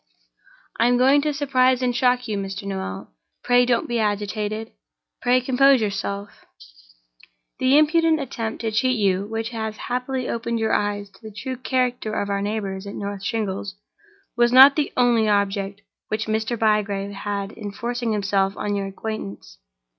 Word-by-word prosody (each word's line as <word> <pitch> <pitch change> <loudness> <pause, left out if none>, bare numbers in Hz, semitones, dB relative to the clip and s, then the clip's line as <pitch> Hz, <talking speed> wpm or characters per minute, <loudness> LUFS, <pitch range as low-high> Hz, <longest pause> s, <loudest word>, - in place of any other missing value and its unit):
"I 235 - +4
am 245 0 +3
going 270 +3 +5
to 300 +1 0
surprise 260 -3 +2
and 245 -1 0
shock 250 +1 +2
you, 215 - -2
Mr. 195 +1 -4
Noel. 190 - -5 0.3
Pray 245 0 +4
don't 240 -2 +1
be 240 -1 -1
agitated! 210 +1 -2 0.5
pray 250 0 +3
compose 265 +1 +4
yourself! 200 -1 -4 1.2
"The 260 +2 +4
impudent 320 +1 +3
attempt 230 -5 -4
to 225 -1 -2
cheat 255 +3 +1
you, 195 -1 +1
which 225 +1 -3
has 220 -2 -4
happily 250 +1 -3
opened 230 0 -2
your 220 0 0
eyes 205 -1 -1
to 190 - -22
the 220 -1 -9
true 260 +5 -5
character 250 -3 -1
of 200 0 -2
our 200 0 -1
neighbors 200 -2 -3
at 200 - -7
North 200 -1 -5
Shingles, 200 -3 -3 0.6
was 240 0 +3
not 265 +2 +9
the 300 -2 0
only 235 -3 +3
object 200 -1 -1 0.2
which 215 +1 -2
Mr. 220 +2 -1
Bygrave 205 -2 0
had 200 0 -4
in 205 -3 -7
forcing 240 +2 -3
himself 195 -1 0
on 205 0 -2
your 200 -1 -2
acquaintance. 105 - -7
220 Hz, 160 wpm, -23 LUFS, 200-245 Hz, 1.2 s, not